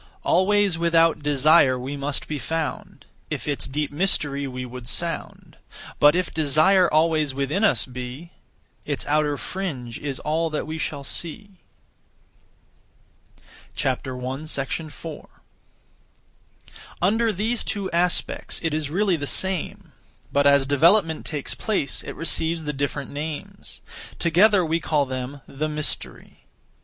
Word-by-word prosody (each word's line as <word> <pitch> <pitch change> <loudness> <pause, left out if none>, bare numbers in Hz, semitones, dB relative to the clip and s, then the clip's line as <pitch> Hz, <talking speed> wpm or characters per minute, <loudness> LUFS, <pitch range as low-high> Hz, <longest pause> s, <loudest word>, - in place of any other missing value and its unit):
Always 195 -1 +3
without 165 -2 +3
desire 145 -1 +4
we 130 +3 -5
must 140 +1 -3
be 150 -2 -3
found, 160 0 -4 0.2
If - - -4
its 145 -2 -2
deep 145 +2 -2
mystery 145 -4 +1
we 125 -1 -5
would 125 -1 -8
sound; - - -4 0.4
But 145 +2 +6
if 180 0 -1
desire 160 +5 +4
always 155 -3 +2
within 140 +9 -1
us 220 - +3
be, 125 +6 -8 0.5
Its - - -3
outer 150 -1 +1
fringe 135 -13 -5
is 140 -2 -4
all 160 +2 0
that 155 - -3
we 160 +1 -5
shall 145 -2 -3
see. 185 +6 -6 2.1
4. 135 +4 -4 1.7
Under 220 +5 +2
these 220 +5 0
two 200 -2 -2
aspects, 175 +1 0
it 165 -2 0
is 155 -2 -1
really 190 +3 +2
the 145 -3 -3
same; 190 0 -1 0.4
but 140 0 +3
as 140 -1 +5
development 160 +4 +3
takes 145 -3 -3
place, 195 - -1
it - - -7
receives 165 0 0
the 150 -1 -3
different 140 0 -3
names. 150 +1 -7 0.4
Together 185 +3 +4
we 165 +1 0
call 150 -2 +1
them 130 +1 -5
the 155 +3 -3
Mystery. 150 0 -3
155 Hz, 125 wpm, -24 LUFS, 140-170 Hz, 2.1 s, But